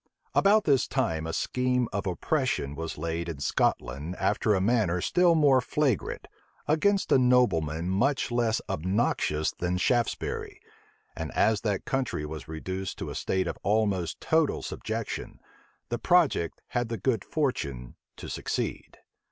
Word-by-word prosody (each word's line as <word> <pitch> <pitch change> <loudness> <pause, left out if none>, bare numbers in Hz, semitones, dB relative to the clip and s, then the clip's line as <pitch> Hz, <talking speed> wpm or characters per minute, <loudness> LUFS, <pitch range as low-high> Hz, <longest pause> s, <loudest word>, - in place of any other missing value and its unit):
About 210 +2 +5
this 140 -7 +3
time, 80 - -1
a - - -2
scheme 125 +6 0
of 100 0 -2
oppression 105 - -1
was 80 +2 -5
laid 85 +2 -3
in 80 - -5
Scotland 70 +4 -1
after 105 +1 +2
a - - +1
manner 100 -4 +2
still 175 - +3
more 140 -4 +5
flagrant, 135 -2 -1 0.4
against 195 +6 +2
a - - +6
nobleman 90 -11 +2
much 125 +9 +1
less 120 -2 +1
obnoxious 85 -4 0
than 90 +1 -2
Shaftesbury; 120 +5 -1 0.6
and - - -5
as 110 -1 +2
that 105 -4 -1
country 135 - -1
was 75 +1 -7
reduced 95 +4 -5
to - - -5
a - - -7
state 95 -1 0
of - - -4
almost 100 -5 0
total 160 -2 +1
subjection, - - -5 0.5
the 120 - -2
project 170 - +2
had 120 -1 -1
the 115 - -2
good 110 0 0
fortune 70 - -2 0.2
to - - -8
succeed. - - -4
105 Hz, 145 wpm, -28 LUFS, 85-130 Hz, 0.6 s, a